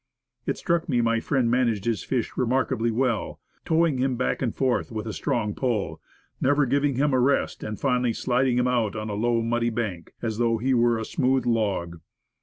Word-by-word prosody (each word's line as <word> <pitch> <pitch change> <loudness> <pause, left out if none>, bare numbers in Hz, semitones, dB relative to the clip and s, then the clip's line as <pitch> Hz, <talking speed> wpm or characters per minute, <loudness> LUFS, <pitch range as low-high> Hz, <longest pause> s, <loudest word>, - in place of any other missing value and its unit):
It - - 0
struck 170 0 -1
me 125 -4 +2
my 115 -1 +2
friend 125 -1 0
managed 115 -5 +1
his 115 -3 -1
fish 125 -4 -2
remarkably 125 -2 +1
well, 115 -1 -1 0.3
towing 160 -4 +2
him 130 0 +1
back 125 - -1
and 125 -4 0
forth 130 -3 0
with 110 -1 -4
a 110 - -4
strong 105 -1 -1
pull, 105 -12 -2 0.4
never 145 +2 +3
giving 140 +1 +1
him 145 +2 +1
a 130 - +3
rest 135 +3 +1
and 105 -1 -5
finally 125 -3 +1
sliding 125 0 +1
him 125 0 +2
out 115 -5 0
on 110 0 -4
a - - -3
low 115 +2 +1
muddy 120 +1 0
bank, 110 -7 -4
as 110 -2 -3
though 115 -1 +2
he 130 +4 0
were 120 -1 +3
a 110 - -3
smooth 130 +1 +1
log. 100 -8 -1
120 Hz, 200 wpm, -25 LUFS, 110-130 Hz, 0.4 s, never